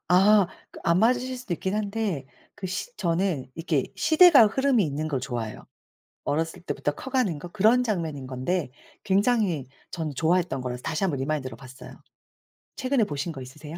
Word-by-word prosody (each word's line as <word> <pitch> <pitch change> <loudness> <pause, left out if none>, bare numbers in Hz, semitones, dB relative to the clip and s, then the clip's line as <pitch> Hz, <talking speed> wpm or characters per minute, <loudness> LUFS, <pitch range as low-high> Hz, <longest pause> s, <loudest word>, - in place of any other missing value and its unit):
아. 195 +2 +6 0.2
그 - - -12
안 170 +1 +3
맞으실 250 +4 +2
수도 245 -8 -3
있긴 190 +3 -3
한데 205 -8 -2 0.3
그 190 - -5
시 200 +6 -5
저는 170 -6 0
이렇게 165 -5 0
시대가 310 -5 +7
흐름이 260 0 +2
있는 150 0 -2
걸 140 -4 -1
좋아해요. 120 -4 -5 0.6
어렸을 165 +4 -1
때부터 155 -3 -2
커가는 250 - -1
거 175 - -7
그런 215 +7 +3
장면인 165 - -3
건데 130 +4 -2 0.3
굉장히 200 - +2 0.2
저는 160 -4 -4
좋아했던 165 -1 +1
거라서 125 -1 -5
다시 155 +3 -2
한번 160 -8 0
리마인드로 135 -3 -3
봤어요. 130 +1 -12 0.9
최근에 260 -2 +1
보신 150 -2 -3
거 135 - -8
있으세요? 150 +5 -9
175 Hz, 360 characters per minute, -26 LUFS, 145-215 Hz, 0.9 s, 시대가